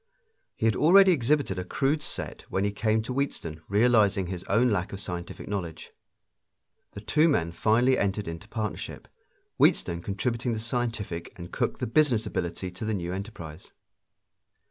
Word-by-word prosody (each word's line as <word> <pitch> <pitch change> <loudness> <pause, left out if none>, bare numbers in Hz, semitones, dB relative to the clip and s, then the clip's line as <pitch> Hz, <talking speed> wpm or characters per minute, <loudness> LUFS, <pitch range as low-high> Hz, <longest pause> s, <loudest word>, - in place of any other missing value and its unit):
He - - -2
had 110 -3 +3
already 185 - +7
exhibited 140 - +1
a - - -2
crude 140 +10 0
set - - -4
when 95 - 0
he 100 - +1
came 110 +1 +1
to 125 - -4
Wheatstone, 85 - -3
realizing 105 -2 +3
his 90 0 -5
own 115 +5 +3
lack 95 -3 -1
of 100 - -6
scientific 90 -3 -6
knowledge. 90 -6 -5 1.0
The 100 - -8
two 155 +9 +3
men 85 - +1
finally 120 +8 +3
entered 100 0 -1
into 85 +5 -7
partnership, 110 -2 -5 0.5
Wheatstone 85 0 +3
contributing 115 +5 -2
the 110 - -3
scientific 115 -7 -3
and 85 -1 -9
Cooke - - -1
the - - -2
business 120 -2 +2
ability 85 +1 -3
to 90 +4 -9
the 110 -1 -1
new 90 -1 -3
enterprise. 95 -5 -8
105 Hz, 160 wpm, -27 LUFS, 90-120 Hz, 1.0 s, already